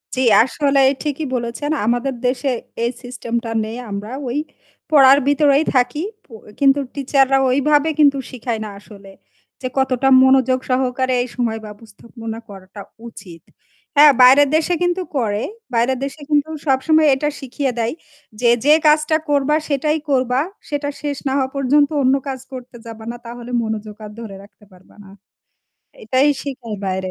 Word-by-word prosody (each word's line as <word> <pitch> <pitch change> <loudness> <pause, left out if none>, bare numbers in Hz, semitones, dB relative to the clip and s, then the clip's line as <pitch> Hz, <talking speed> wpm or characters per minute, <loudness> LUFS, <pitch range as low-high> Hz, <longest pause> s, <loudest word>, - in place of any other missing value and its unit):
জী, 260 - -1 0.2
আসলে 275 +2 0 0.2
ঠিকই 300 0 -3
বলেছেন। 240 +5 -3
আমাদের 245 +4 0
দেশে 260 +2 -1 0.3
এই 235 - 0
সিস্টেমটা 235 -2 -4
নেই। 220 +2 -6
আমরা 205 +3 -6 0.2
ওই 245 +3 -2 0.5
পড়ার 275 -2 +7
ভেতরেই 285 0 +3
থাকি, 250 +4 +1 0.2
প - - -32 0.3
কিন্তু 275 0 +4 0.2
টিচাররা 270 -1 +2
ওইভাবে 290 +4 +2
কিন্তু 285 -2 +5
শেখায় 235 -2 -4
না - - -6
আসলে 200 -1 -15 0.5
যে 255 - -2
কতটা 265 0 +1 0.2
মনোযোগ 260 -1 +3
সহকারে 255 0 0
এই - - -7
সময় 230 -3 -2
ব্যবস্থাপনা 225 +2 -10
করাটা 195 +1 -11 0.3
উচিত। 175 -7 -12 0.5
হ্যাঁ, 295 +1 +8
বাইরের 270 +3 +7
দেশে 320 +2 +1
কিন্তু 355 +1 0 0.2
করে। 210 -4 -1 0.3
বাইরের 240 +3 +1
দেশে 280 +2 -8
কিন্তু 295 +1 +2 0.2
সবসময় 305 +4 +3
এটা 295 +2 -1
শিখিয়ে 270 +1 -3
দেয় 230 0 -1 0.5
যে, 245 - +3 0.2
যে 300 - +7
কাজটা 305 +1 +3
করবা, 290 +1 +2
সেটাই 300 +2 0
করবা। 255 -2 +1 0.3
সেটা 290 -1 -2
শেষ 290 -2 -3
না - - 0
হওয়া 265 -1 0
পর্যন্ত 280 +2 +2
অন্য 260 +1 +3
কাজ 265 -1 -4
করতে 255 -1 -10
যাবা 225 -1 -10
না। - - -8
তাহলে 240 +1 -9
মনোযোগ 215 -1 -5
আর 210 - -9
ধরে 220 -4 -8
রাখতে 205 +1 -20
পারবা 185 0 -21
না। 195 - -15 1.0
এটাই 265 +2 +2
শেখায় 250 -7 -6
বাইরে। 190 0 -3
260 Hz, 155 wpm, -19 LUFS, 230-285 Hz, 1.0 s, হ্যাঁ